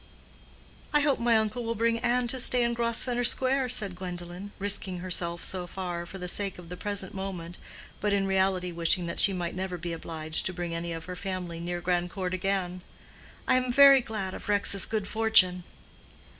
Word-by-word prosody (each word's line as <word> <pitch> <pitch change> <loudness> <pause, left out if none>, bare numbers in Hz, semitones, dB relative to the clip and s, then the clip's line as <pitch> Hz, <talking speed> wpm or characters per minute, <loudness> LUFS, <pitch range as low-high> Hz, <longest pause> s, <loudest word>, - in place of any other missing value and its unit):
"I 295 - +5
hope 285 -2 +2
my 235 -1 +3
uncle 220 +3 -1
will 230 0 -2
bring 230 +1 +1
Ann 245 +1 +1
to 260 - +1
stay 245 0 +3
in 235 0 +1
Grosvenor 235 +1 +1
Square," 260 +1 +2
said 210 -7 +4
Gwendolen, 180 +2 -7
risking 195 -2 0
herself 175 -1 -2
so 180 -2 0
far, 175 -2 -5
for 195 - -9
the 180 -1 -6
sake 195 +1 0
of 175 -2 -12
the 180 - -6
present 200 0 -5
moment, 180 -3 -6 0.4
but 210 - 0
in 200 -1 +1
reality 190 -1 +1
wishing 170 +1 +1
that 170 - -4
she 200 - +5
might 175 -3 -3
never 185 -1 -4
be 170 0 -5
obliged 160 0 -3
to 185 - -4
bring 175 -1 -4
any 170 +1 -4
of 165 0 -6
her 180 +1 -6
family 180 -3 -5
near 175 +1 -4
Grandcourt 180 +1 -2
again. 185 -1 -2 0.7
"I 255 - +4
am 255 -1 0
very 275 +1 +8
glad 205 -5 -4
of - - -8
Rex's 200 -2 +3
good 215 -3 -2
fortune." 205 -5 +4
190 Hz, 190 wpm, -28 LUFS, 175-225 Hz, 0.7 s, very